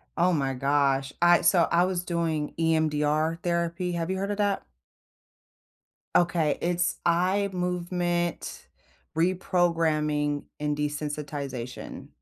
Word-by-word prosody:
Oh 175 Hz, +1 st, +3 dB
my 135 Hz, -3 st, 0 dB
gosh, 135 Hz, 0 st, +1 dB
I 175 Hz, 0 st, +6 dB
so, 175 Hz, -3 st, +4 dB
I 170 Hz, +1 st, +4 dB
was 185 Hz, -1 st, -1 dB
doing 165 Hz, -4 st, -1 dB
EMDR 155 Hz, 0 st, +1 dB
therapy, 170 Hz, +1 st, -1 dB
have 170 Hz, 0 st, -2 dB
you 190 Hz, -, -1 dB
heard 195 Hz, +2 st, -2 dB
of 205 Hz, -, -3 dB
that? 205 Hz, -1 st, 0 dB, 1.5 s
Okay, 170 Hz, -4 st, +2 dB
it's 175 Hz, 0 st, 0 dB
eye 185 Hz, +4 st, +2 dB
movement 175 Hz, -1 st, -2 dB, 0.5 s
reprogramming 165 Hz, -5 st, +1 dB, 0.2 s
and 150 Hz, 0 st, -1 dB
desensitization. 145 Hz, -4 st, -5 dB
170 Hz, 110 wpm, -27 LUFS, 150-175 Hz, 1.5 s, I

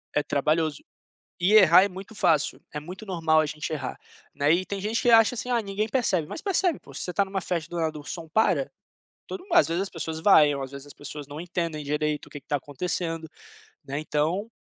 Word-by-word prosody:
É 150 Hz, -, +2 dB
trabalhoso, 155 Hz, +2 st, 0 dB, 0.6 s
e 180 Hz, +4 st, +3 dB
errar 185 Hz, -3 st, +8 dB
é -, -, 0 dB
muito 195 Hz, +3 st, -10 dB
fácil, 165 Hz, -8 st, +1 dB
é 150 Hz, -, -4 dB
muito 185 Hz, +7 st, -9 dB
normal 165 Hz, -4 st, +2 dB
a 155 Hz, -, +1 dB
gente 150 Hz, +1 st, -5 dB
errar, 155 Hz, -, -4 dB, 0.4 s
né, 145 Hz, +1 st, +1 dB
e 180 Hz, +2 st, +2 dB
tem 200 Hz, -1 st, -4 dB
gente 215 Hz, +4 st, -1 dB
que 245 Hz, -, +4 dB
acha 225 Hz, +1 st, +6 dB
assim: 245 Hz, +1 st, -4 dB
"Ah, 240 Hz, -2 st, +2 dB
ninguém 205 Hz, +2 st, -2 dB
percebe." 195 Hz, -, +1 dB
Mas 310 Hz, -, -6 dB
percebe, 375 Hz, -5 st, +1 dB
pô. -, -, -15 dB
Se -, -, -5 dB
você 180 Hz, -, -3 dB
está 200 Hz, -, +2 dB
em -, -, -13 dB
uma 190 Hz, 0 st, -2 dB
festa, 170 Hz, -3 st, -3 dB
do 175 Hz, -, -5 dB
nada 160 Hz, -2 st, -1 dB
o 145 Hz, -, -11 dB
som 165 Hz, +2 st, -6 dB
para, 175 Hz, -6 st, +2 dB, 0.6 s
todo 380 Hz, -, -6 dB
mundo 365 Hz, -2 st, -4 dB
às 345 Hz, -, +6 dB
vezes 170 Hz, +3 st, 0 dB
as 195 Hz, -, -4 dB
pessoas 160 Hz, -1 st, -4 dB
vaiam 150 Hz, -6 st, +5 dB
ou 135 Hz, -, -3 dB
às 130 Hz, -, -9 dB
vezes 140 Hz, 0 st, -9 dB
as 145 Hz, -, -11 dB
pessoas 145 Hz, 0 st, -8 dB
não 145 Hz, +2 st, -8 dB
entendem 170 Hz, -3 st, -3 dB
direito 150 Hz, +1 st, -1 dB
o -, -, -16 dB
que 145 Hz, -, -8 dB
que -, -, -43 dB
está 145 Hz, -, 0 dB
acontecendo, 165 Hz, +3 st, -3 dB, 0.6 s
né, 140 Hz, +1 st, -4 dB
então 160 Hz, +8 st, -1 dB
165 Hz, 240 wpm, -26 LUFS, 150-200 Hz, 0.6 s, errar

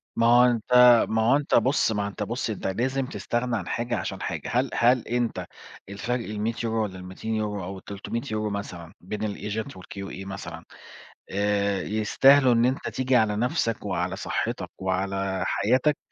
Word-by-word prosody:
ما 115 Hz, -, +2 dB
هو 120 Hz, +1 st, +7 dB
أنت 120 Hz, 0 st, 0 dB, 0.4 s
ما 110 Hz, 0 st, +1 dB
هو 120 Hz, +5 st, +4 dB
أنت 145 Hz, 0 st, +1 dB
بُص، 130 Hz, -3 st, +3 dB
ما 105 Hz, -2 st, -1 dB
هو 100 Hz, -, -2 dB
أنت 105 Hz, +1 st, -4 dB
بُص، 115 Hz, +3 st, -3 dB
أنت 110 Hz, -, -3 dB
لازم 130 Hz, +7 st, -1 dB
تستغنى 120 Hz, +2 st, -2 dB
عن 95 Hz, -, -6 dB
حاجة، 120 Hz, 0 st, -2 dB
عشان -, -, -4 dB
حاجة. -, -, -4 dB
هل 125 Hz, +2 st, +2 dB
هل 120 Hz, 0 st, +3 dB
أنت 120 Hz, -1 st, -1 dB, 0.4 s
الفرق 115 Hz, +4 st, -3 dB
ال100€ 110 Hz, +2 st, -2 dB
والّا 95 Hz, -3 st, -5 dB
ال200€ 105 Hz, +2 st, -3 dB
أو 95 Hz, +2 st, -6 dB
ال300€ 105 Hz, +2 st, -4 dB
مثلًا 90 Hz, -5 st, -6 dB
بين 100 Hz, +4 st, -6 dB
الagent 105 Hz, +4 st, -4 dB
والQA 95 Hz, +1 st, -8 dB
مثلًا، 85 Hz, -4 st, -7 dB, 0.7 s
آآ، 100 Hz, 0 st, 0 dB
يستاهلوا 125 Hz, +5 st, +4 dB
إن 115 Hz, 0 st, +3 dB
أنت 130 Hz, +2 st, -1 dB
تيجي 130 Hz, 0 st, 0 dB
على 110 Hz, -3 st, +3 dB
نفسك، 115 Hz, -1 st, -1 dB
وعلى 90 Hz, -1 st, -1 dB
صحّتك، -, -, -3 dB
وعلى 95 Hz, 0 st, -1 dB
حياتك؟ 125 Hz, +9 st, +2 dB
110 Hz, 160 wpm, -26 LUFS, 100-120 Hz, 0.7 s, هو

